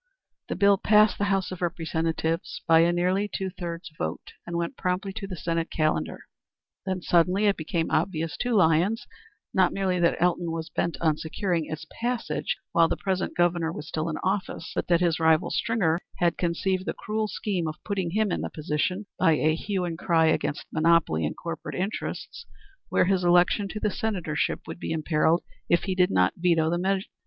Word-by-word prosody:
The -, -, -1 dB
bill 200 Hz, -1 st, +4 dB
passed 210 Hz, 0 st, +4 dB
the 205 Hz, -, +2 dB
House 195 Hz, -2 st, 0 dB
of 185 Hz, -, -7 dB
Representatives 165 Hz, -1 st, -2 dB
by 165 Hz, 0 st, +6 dB
a 170 Hz, +1 st, +4 dB
nearly 185 Hz, +4 st, +1 dB
two 190 Hz, -1 st, -3 dB
thirds 170 Hz, -1 st, -6 dB
vote 80 Hz, +1 st, -4 dB
and 170 Hz, 0 st, -3 dB
went 170 Hz, 0 st, -2 dB
promptly 185 Hz, +2 st, -2 dB
to 200 Hz, -1 st, -6 dB
the 190 Hz, -, -5 dB
Senate 165 Hz, 0 st, -2 dB
calendar. 155 Hz, -, -1 dB, 0.7 s
Then 185 Hz, -2 st, -2 dB
suddenly 180 Hz, +4 st, +3 dB
it 200 Hz, -1 st, +4 dB
became 160 Hz, +1 st, -2 dB
obvious 165 Hz, -1 st, 0 dB
to 245 Hz, -1 st, 0 dB
Lyons 190 Hz, +6 st, +3 dB, 0.5 s
not 185 Hz, -2 st, +4 dB
merely 190 Hz, -2 st, 0 dB
that 170 Hz, -1 st, +2 dB
Elton 175 Hz, -1 st, +1 dB
was 165 Hz, -1 st, -5 dB
bent 170 Hz, -, -1 dB
on 155 Hz, -2 st, +2 dB
securing 165 Hz, 0 st, -2 dB
its 155 Hz, 0 st, -6 dB, 0.2 s
passage 240 Hz, 0 st, -1 dB
while 165 Hz, -1 st, +5 dB
the -, -, -2 dB
present 190 Hz, -1 st, -2 dB
Governor 175 Hz, -2 st, +2 dB
was 150 Hz, -2 st, -8 dB
in 160 Hz, 0 st, -2 dB
office, 190 Hz, -3 st, -2 dB
but -, -, -2 dB
that 175 Hz, -1 st, +3 dB
his 170 Hz, -3 st, +2 dB
rival, 160 Hz, -1 st, +3 dB
Stringer, 190 Hz, -8 st, +1 dB, 0.2 s
had 175 Hz, -2 st, +2 dB
conceived 185 Hz, +2 st, -1 dB
the -, -, -2 dB
cruel 215 Hz, +1 st, -2 dB
scheme 190 Hz, -5 st, -2 dB
of 155 Hz, -, -4 dB
putting 195 Hz, -4 st, -1 dB
him 210 Hz, +2 st, +1 dB
in -, -, -1 dB
the -, -, -3 dB
position, 160 Hz, +6 st, -2 dB
by 165 Hz, -, +5 dB
a 155 Hz, +1 st, +2 dB
hue 185 Hz, +2 st, -2 dB
and 165 Hz, -1 st, -4 dB
cry 165 Hz, -2 st, +3 dB
against 160 Hz, -2 st, 0 dB
monopoly 155 Hz, -, +3 dB
and -, -, -6 dB
corporate -, -, -6 dB
interests, 215 Hz, -, -4 dB, 0.4 s
where -, -, +3 dB
his 185 Hz, -1 st, +1 dB
election 175 Hz, +3 st, +4 dB
to 215 Hz, -, -5 dB
the 210 Hz, -1 st, 0 dB
senatorship 185 Hz, -9 st, -1 dB
would -, -, -8 dB
be -, -, -4 dB
imperilled 160 Hz, +1 st, +2 dB, 0.3 s
if 170 Hz, -, +3 dB
he 190 Hz, -, -1 dB
did 180 Hz, -1 st, +3 dB
not 90 Hz, 0 st, +3 dB
veto 165 Hz, -2 st, +2 dB
the 175 Hz, -, 0 dB
measure. 190 Hz, +1 st, 0 dB
175 Hz, 190 wpm, -26 LUFS, 165-195 Hz, 0.7 s, by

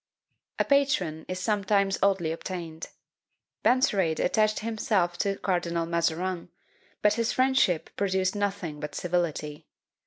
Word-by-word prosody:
A -, -, +2 dB
patron 230 Hz, -, +1 dB
is 185 Hz, -, -3 dB
sometimes 200 Hz, 0 st, +1 dB
oddly 190 Hz, -5 st, +2 dB
obtained. 165 Hz, -1 st, -6 dB, 0.8 s
Benserade 195 Hz, -10 st, +3 dB
attached 215 Hz, +2 st, +2 dB
himself 210 Hz, -5 st, 0 dB
to 200 Hz, -1 st, +1 dB
Cardinal 170 Hz, -3 st, -1 dB
Mazarin; 170 Hz, +2 st, -1 dB, 0.5 s
but 210 Hz, 0 st, +5 dB
his 230 Hz, +1 st, 0 dB
friendship 255 Hz, -10 st, +2 dB
produced 190 Hz, -1 st, 0 dB
nothing 195 Hz, -7 st, -2 dB
but 150 Hz, -1 st, -6 dB
civility. 165 Hz, -4 st, -2 dB
185 Hz, 115 wpm, -27 LUFS, 170-205 Hz, 0.8 s, but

